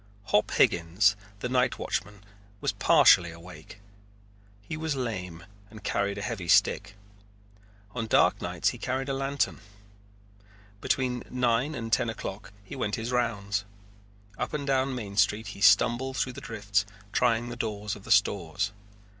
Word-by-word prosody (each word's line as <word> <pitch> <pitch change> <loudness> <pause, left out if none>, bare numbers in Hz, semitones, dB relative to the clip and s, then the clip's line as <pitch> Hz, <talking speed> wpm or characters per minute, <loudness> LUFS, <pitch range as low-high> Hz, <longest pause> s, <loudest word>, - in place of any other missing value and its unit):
Hop 105 - +3
Higgins, 90 +5 +3 0.3
the - - -1
night 125 -1 +1
watchman, 100 -3 -4 0.4
was - - 0
partially 85 -1 +5
awake. 85 +2 -12 0.8
He 130 - -5
was 160 -1 -2
lame 95 -9 -4 0.2
and 110 +1 -13
carried 100 0 -1
a 100 - -4
heavy 105 -6 -4
stick. 85 - +3 1.0
On 115 -2 -3
dark - - +3
nights - - 0
he - - -7
carried 130 +2 -2
a - - 0
lantern. 135 -5 -1 1.2
Between 125 -2 0
nine 125 +4 +1
and 115 -2 -4
ten 120 - +2
o'clock 100 -2 -6
he 100 - -9
went 105 -6 -1
his 115 +2 -4
rounds. 105 -4 -1 0.8
Up 125 - -2
and 145 -2 -3
down 135 -1 +1
Main 100 -5 -6
Street 105 +1 +2
he 100 - -12
stumbled 120 +7 +4
through 130 - -1
the - - -9
drifts 105 -3 -1 0.3
trying 120 -1 +2
the 120 - -6
doors 105 -3 -3
of 100 - -13
the - - -12
stores. 100 0 +2
110 Hz, 150 wpm, -28 LUFS, 100-125 Hz, 1.2 s, partially